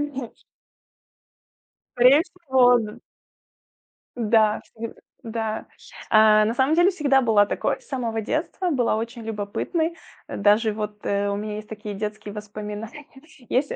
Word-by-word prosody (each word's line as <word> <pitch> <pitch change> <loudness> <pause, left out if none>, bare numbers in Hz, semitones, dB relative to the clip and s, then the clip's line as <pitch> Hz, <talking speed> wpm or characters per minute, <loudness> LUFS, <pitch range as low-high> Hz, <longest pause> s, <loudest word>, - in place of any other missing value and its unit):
мгм. 270 -5 -4 1.7
Скорее 255 +5 +7
всего, 265 -9 +3
да. 215 -2 -5 1.2
Да, 220 -2 +3
сам 230 0 -6 0.3
да. 220 -1 -3 0.4
Э, 215 0 +6
на 225 - -1
самом 265 +5 +2
деле 350 +3 +5
всегда 285 -6 +2
была 220 -5 +4
такой, - - -2
с - - -23
самого 235 -4 -2
детства 345 - -2
была 245 -7 +1
очень 230 +1 -5
любопытной. 225 - -2 0.3
Э, - - -5
даже 210 +2 +3
вот, 210 0 -6
э, 200 0 0
у 200 - -1
меня 210 0 -4
есть 215 0 -8
такие 210 -1 -7
детские 210 0 -5
воспоминания. 210 +5 -7 0.5
Есть 270 +3 +1
225 Hz, 135 wpm, -24 LUFS, 210-265 Hz, 1.7 s, Скорее